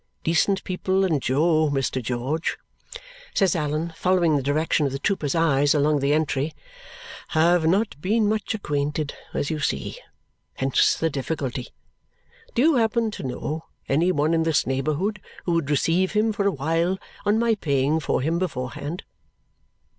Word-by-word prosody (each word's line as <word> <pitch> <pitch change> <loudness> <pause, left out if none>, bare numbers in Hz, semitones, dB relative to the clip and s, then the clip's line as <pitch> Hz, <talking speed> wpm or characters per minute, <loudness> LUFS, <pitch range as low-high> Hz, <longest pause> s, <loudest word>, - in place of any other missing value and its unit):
Decent 190 +4 +2
people 190 +1 0
and 155 -7 +1
Jo, 155 +4 +2
Mr. 135 -2 -1
George," 125 +7 -2 0.8
says 190 -3 +3
Allan, 155 +1 -2
following 180 -4 +2
the 140 - +1
direction 150 +2 +1
of - - -4
the 135 - -3
trooper's 150 -2 -1
eyes 145 -3 +3
along 150 0 +3
the 140 +1 +1
entry, 150 -1 0 0.8
"have 165 0 +4
not 195 -3 +1
been 210 +4 +2
much 215 +1 -1
acquainted, 150 -5 -2 0.2
as 140 - -1
you 155 - -2
see. 70 - -2 0.6
Hence 135 0 +2
the 165 0 -1
difficulty. 135 -3 -3 0.9
Do 240 - +3
you 320 -1 +5
happen 225 -1 +1
to - - -7
know 150 +5 -4 0.2
any 165 +6 +2
one 155 0 +1
in 165 - +2
this 160 -1 +2
neighbourhood 155 +10 -1 0.2
who 175 - 0
would 165 -4 0
receive 165 +6 +2
him 215 +1 +2
for 200 -1 0
a - - +3
while 165 +5 0 0.3
on 205 +1 +2
my 230 0 +3
paying 145 -5 +1
for 150 - 0
him 165 +4 0
beforehand?" 145 - -4
160 Hz, 155 wpm, -24 LUFS, 145-185 Hz, 0.9 s, you